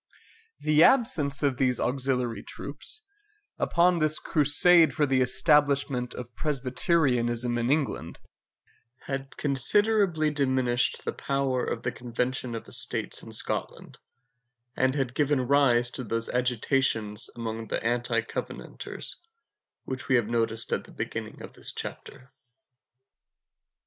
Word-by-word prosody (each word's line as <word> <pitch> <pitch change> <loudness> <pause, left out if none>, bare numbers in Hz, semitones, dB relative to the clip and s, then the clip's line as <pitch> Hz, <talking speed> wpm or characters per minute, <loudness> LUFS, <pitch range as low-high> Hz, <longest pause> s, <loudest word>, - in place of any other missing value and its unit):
The 155 +1 +4
absence 160 - +2
of 135 -3 +1
these 130 -2 +1
auxiliary 125 -4 -1
troops, 145 - -8 0.6
upon 175 0 +3
this 155 0 0
crusade 160 +3 +3
for 150 - +2
the 135 -2 +1
establishment 140 -2 +2
of 125 -1 -8
Presbyterianism 125 -4 0
in 120 +1 -1
England, 140 - -1 0.8
had 135 0 -6
considerably 160 - +3
diminished 130 -4 +1
the - - -2
power 135 -2 -1
of 115 - -3
the - - -1
Convention 125 0 -2
of 115 - -7
Estates - - +2
in - - -11
Scotland, - - -2 0.8
and 130 +1 +1
had 135 -4 -1
given 145 -1 +1
rise 125 -4 +3
to 130 - -5
those 115 0 -2
agitations 125 -3 0
among 115 -1 -5
the - - -3
anti 120 +1 +1
covenanters, - - -6 0.7
which 130 -1 -6
we 130 - +3
have 120 -4 +2
noticed 115 -1 0
at - - -2
the - - -15
beginning - - -6
of - - -10
this - - -4
chapter. 130 - -6
130 Hz, 125 wpm, -27 LUFS, 120-145 Hz, 0.8 s, The